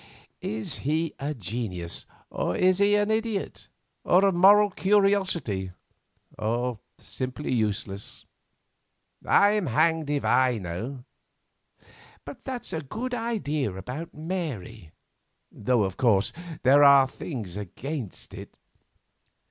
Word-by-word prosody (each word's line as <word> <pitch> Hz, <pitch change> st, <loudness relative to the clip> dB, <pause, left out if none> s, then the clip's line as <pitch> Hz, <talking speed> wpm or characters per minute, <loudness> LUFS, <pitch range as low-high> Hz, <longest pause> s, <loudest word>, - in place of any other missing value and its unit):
Is 110 Hz, 0 st, -4 dB
he 155 Hz, +3 st, -1 dB
a 150 Hz, +2 st, -3 dB
genius, 100 Hz, -6 st, -4 dB, 0.2 s
or 90 Hz, -, -1 dB
is 185 Hz, -, +3 dB
he 205 Hz, +1 st, +4 dB
an 205 Hz, +1 st, +2 dB
idiot, 220 Hz, -2 st, -2 dB, 0.3 s
or 185 Hz, +3 st, +4 dB
a 195 Hz, -, +4 dB
moral 200 Hz, +3 st, +6 dB
curiosity, 190 Hz, -, +1 dB, 0.7 s
or 120 Hz, +1 st, -1 dB, 0.2 s
simply 130 Hz, +2 st, -4 dB
useless? 105 Hz, -3 st, -2 dB, 1.0 s
I'm 205 Hz, -2 st, +4 dB
hanged 155 Hz, +4 st, +2 dB
if 145 Hz, -1 st, -1 dB
I 130 Hz, -2 st, +3 dB
know, 110 Hz, +8 st, -5 dB, 1.2 s
but 255 Hz, -, -10 dB
that's 255 Hz, -3 st, -6 dB
a 160 Hz, -, -2 dB
good 230 Hz, -, -5 dB
idea 175 Hz, -, -1 dB
about 125 Hz, -, -6 dB
Mary; 135 Hz, -, -5 dB, 0.6 s
though, 115 Hz, +1 st, +1 dB
of 95 Hz, -1 st, -3 dB
course, 105 Hz, -6 st, +3 dB, 0.3 s
there 140 Hz, +3 st, +6 dB
are 140 Hz, -1 st, +7 dB
things 115 Hz, -, -7 dB
against 110 Hz, -, -6 dB
it. -, -, -10 dB
140 Hz, 110 wpm, -26 LUFS, -, 1.2 s, are